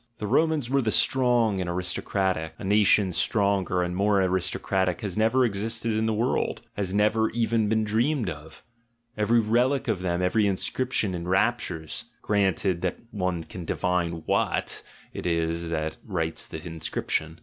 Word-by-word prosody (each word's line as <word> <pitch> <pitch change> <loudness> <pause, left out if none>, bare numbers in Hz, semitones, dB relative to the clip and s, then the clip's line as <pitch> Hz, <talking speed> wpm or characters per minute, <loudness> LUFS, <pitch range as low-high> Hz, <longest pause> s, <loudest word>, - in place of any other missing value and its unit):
The 105 - -4
Romans 155 +3 +2
were 135 +2 +2
the 110 -3 0
strong 120 -7 +3
and 90 - -3
aristocratic; 90 -1 -1
a - - -9
nation 100 -1 +3
stronger 100 -2 +1
and 90 0 -3
more 100 +1 +2
aristocratic 95 +2 0
has 100 -5 -4
never 115 +4 +3
existed 115 +2 -2
in 110 +1 0
the - - +1
world, 115 +4 0
has 100 -3 -2
never 105 +2 +2
even 115 -2 +1
been 110 0 +2
dreamed 115 +4 +1
of; 80 -1 -8 0.5
every 110 +3 +3
relic 120 +6 +1
of 105 -6 0
them, 90 -1 -1
every 105 +3 +2
inscription 105 +1 0
enraptures, 90 -2 -1 0.2
granted 95 -3 +1
that 90 - -1
one 90 -4 -2
can 90 +2 -8
divine 85 -1 -1
what - - 0 0.3
it - - -4
is 85 0 -1
that 80 -1 -2
writes 80 -6 -2
the 80 +1 -8
inscription. 80 -1 -3
100 Hz, 150 wpm, -26 LUFS, 90-110 Hz, 0.5 s, strong